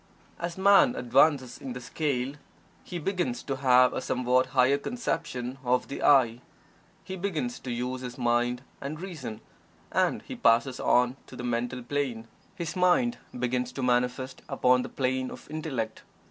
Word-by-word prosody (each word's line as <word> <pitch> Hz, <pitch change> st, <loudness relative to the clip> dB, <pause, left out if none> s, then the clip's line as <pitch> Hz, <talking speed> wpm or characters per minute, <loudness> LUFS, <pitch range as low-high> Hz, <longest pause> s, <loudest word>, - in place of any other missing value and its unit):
As 170 Hz, +1 st, -4 dB
Man 195 Hz, -9 st, +6 dB
advances 130 Hz, +1 st, +2 dB
in 130 Hz, -, -6 dB
the 125 Hz, -, -6 dB
scale, 135 Hz, 0 st, -2 dB, 0.5 s
he 180 Hz, -, -6 dB
begins 195 Hz, +8 st, -2 dB
to 135 Hz, -2 st, -3 dB
have 125 Hz, -1 st, +5 dB
a -, -, -2 dB
somewhat 125 Hz, +1 st, +1 dB
higher 130 Hz, +1 st, +3 dB
conception 140 Hz, -, -3 dB
of 125 Hz, 0 st, +1 dB
the -, -, -5 dB
"I." 125 Hz, -4 st, +4 dB, 0.6 s
He 190 Hz, -, -6 dB
begins 200 Hz, +6 st, -2 dB
to 125 Hz, -, -6 dB
use 125 Hz, +2 st, -3 dB
his 125 Hz, -1 st, -7 dB
mind 120 Hz, 0 st, +1 dB, 0.2 s
and 150 Hz, +3 st, -5 dB
reason, 150 Hz, -, -7 dB, 0.5 s
and -, -, +1 dB
he -, -, -7 dB
passes 120 Hz, +3 st, +3 dB
on 125 Hz, +1 st, +3 dB
to -, -, -11 dB
the 125 Hz, -, -7 dB
Mental 125 Hz, +1 st, -2 dB
Plane 120 Hz, -4 st, -2 dB, 0.3 s
his 170 Hz, -4 st, -4 dB
mind 180 Hz, +7 st, +3 dB, 0.2 s
begins 125 Hz, 0 st, -1 dB
to 135 Hz, -, -4 dB
manifest 125 Hz, +1 st, 0 dB
upon 125 Hz, 0 st, +3 dB
the -, -, -5 dB
plane 130 Hz, -1 st, -1 dB
of -, -, -11 dB
Intellect. 135 Hz, -8 st, -3 dB
130 Hz, 160 wpm, -28 LUFS, 125-155 Hz, 0.6 s, Man